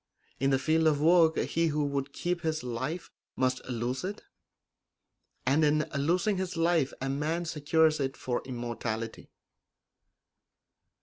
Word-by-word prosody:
In 135 - +2
the 135 - +3
field 160 +3 +2
of 150 -2 +3
work 165 +1 +5
he 165 0 +1
who 150 -1 0
would 140 -1 -2
keep 175 +3 -2
his 155 -2 -1
life 130 +8 -4 0.2
must 130 0 0
lose 125 +3 -2
it, 200 +3 -5 1.2
and 140 +5 +3
in 150 0 +3
losing 175 +8 +1
his 185 -2 -3
life 165 -4 +2
a 135 - -3
man 155 +5 -1
secures 160 0 +2
it 135 -1 -2
for 125 -1 -2
immortality. 120 -2 -4
150 Hz, 135 wpm, -29 LUFS, 130-165 Hz, 1.2 s, work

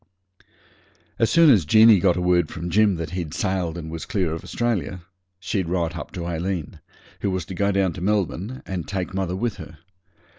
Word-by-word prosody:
As 115 - +3
soon 165 -3 +6
as 105 -9 +5
Jeanie 110 +5 +6
got 90 -1 +2
a - - -1
word 90 -2 +2
from 85 +1 -5
Jim 105 +1 +4
that 80 -2 -5
he'd 85 -5 -4
sailed 90 -4 -1
and 80 -2 -7
was 80 -1 -6
clear 90 -6 -1
of 80 - -6
Australia, 95 -7 -2 0.4
she'd 95 -1 -2
write 85 -1 -1
up - - -7
to 85 -2 -5
Aileen, 85 -1 -3 0.4
who 100 - -1
was 95 -2 -2
to 95 - -7
go 100 +2 +1
down 95 -3 +1
to 90 - -8
Melbourne, 105 +4 -1
and 90 -3 -4
take 95 -1 -3
mother 95 -2 -2
with 115 +1 -2
her. 80 -3 -10
90 Hz, 195 wpm, -23 LUFS, 85-100 Hz, 0.4 s, soon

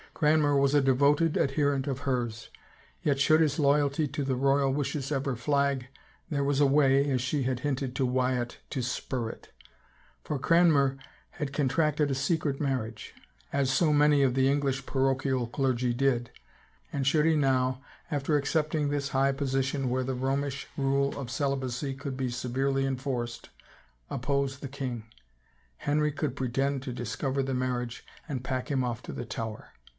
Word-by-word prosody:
Cranmer 150 -2 +3
was 140 +1 +3
a 145 - +5
devoted 145 +4 +3
adherent 140 -1 +1
of 140 0 -2
hers, 120 -5 -2 0.5
yet 140 -2 +1
should 155 +3 +5
his 150 -2 +2
loyalty 145 0 +2
to 145 +2 -3
the 135 -1 0
royal 135 +1 +2
wishes 140 0 -2
ever 135 -2 -1
flag, 140 +1 0 0.4
there 140 -3 0
was 140 0 +1
a 145 - +6
way, 140 0 +4
as 130 -3 +1
she 135 +2 -1
had 125 -1 -1
hinted 135 -3 -2
to 130 - +1
Wyatt, 125 -1 0
to 130 -4 -2
spur 125 -1 -3
it. - - -11 0.7
For 150 - -2
Cranmer 145 -3 +4 0.3
had 140 -2 -5
contracted 150 +1 +1
a - - 0
secret 140 0 0
marriage, 125 -6 -3 0.4
as 140 -2 +1
so 155 +1 +3
many 145 -1 +5
of 130 -2 +2
the 135 0 +3
English 135 -1 0
parochial 135 -2 0
clergy 125 -1 0
did, 120 -2 +1 0.6
and 140 -2 -1
should 150 +2 +3
he 165 -1 +4
now, 130 -2 +1 0.3
after 145 +1 +1
accepting 150 +1 0
this 140 -1 -1
high 135 +1 +2
position, 135 -1 -1
where 130 +1 0
the 130 0 -2
Romish 135 +2 -2
rule 140 0 +1
of 125 -3 -5
celibacy 135 -1 -2
could 135 0 -5
be 130 -1 -1
severely 135 +3 -1
enforced, 130 -3 -3 0.6
oppose 140 +1 -1
the 140 - -6
king, 130 -4 -5 0.7
Henry 150 +1 +1
could 145 -2 -3
pretend 135 +1 -1
to 130 -3 -5
discover 130 +4 -2
the 135 -1 -2
marriage 125 -2 -2 0.2
and 135 -5 -4
pack 130 -1 -3
him 135 -3 +1
off 120 -1 -3
to - - -7
the 120 - -5
Tower. 110 -1 -6
135 Hz, 165 wpm, -28 LUFS, 130-145 Hz, 0.7 s, a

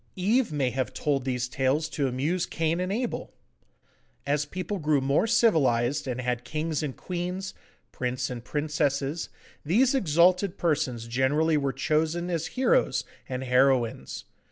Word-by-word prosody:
Eve 220 +5 +2
may 135 -4 0
have 130 -3 -3
told 140 -3 0
these 125 -1 -1
tales 135 +5 0
to 145 -3 -1
amuse 145 +8 -1
Cain 165 +1 -1
and 185 +1 -1
Abel. 240 +4 -3 0.9
As 145 +1 +1
people 185 +4 -4
grew 150 -2 +2
more 140 +10 +2
civilised 145 - +2
and 125 -1 -3
had 125 -1 -2
kings 155 +2 -2
and 145 -4 -4
queens, 180 +2 -4 0.4
princes 125 0 -2
and 120 -2 -6
princesses, 145 +1 -1 0.3
these 235 - +3
exalted 180 - +3
persons 145 -8 0
generally 145 +6 +2
were 140 -2 +1
chosen 160 +5 0
as 165 -1 -1
heroes - - +2 0.3
and 130 0 -3
heroines. 125 - +1
150 Hz, 140 wpm, -27 LUFS, 130-175 Hz, 0.9 s, these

